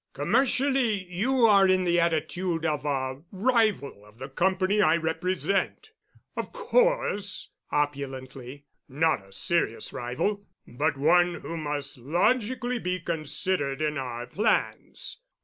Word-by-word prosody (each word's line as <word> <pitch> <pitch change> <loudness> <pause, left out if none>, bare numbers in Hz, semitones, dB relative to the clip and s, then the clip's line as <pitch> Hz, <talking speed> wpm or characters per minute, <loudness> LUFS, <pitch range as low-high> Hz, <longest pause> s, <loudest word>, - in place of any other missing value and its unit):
Commercially 245 - +1
you 245 +7 +2
are 200 -3 +6
in 185 0 +3
the 175 -1 +2
attitude 170 +1 0
of 150 -2 -1
a 130 -1 -2
rival 210 - +1
of 105 +1 -19
the 130 +2 -7
company 190 +7 +1
I 170 - +4
represent. 180 - -1 0.4
Of - - -4
course"—opulently—"not 145 - -1
a 95 - -19
serious 115 - -1
rival, 130 +13 -2 0.2
but 145 +4 -1
one 175 +4 +4
who 170 - -6
must 145 -4 -4
logically 240 - 0
be 180 -3 -2
considered 160 -3 -2
in 150 -1 -1
our 120 -2 -5
plans. 210 - -1
170 Hz, 115 wpm, -27 LUFS, 140-200 Hz, 0.4 s, are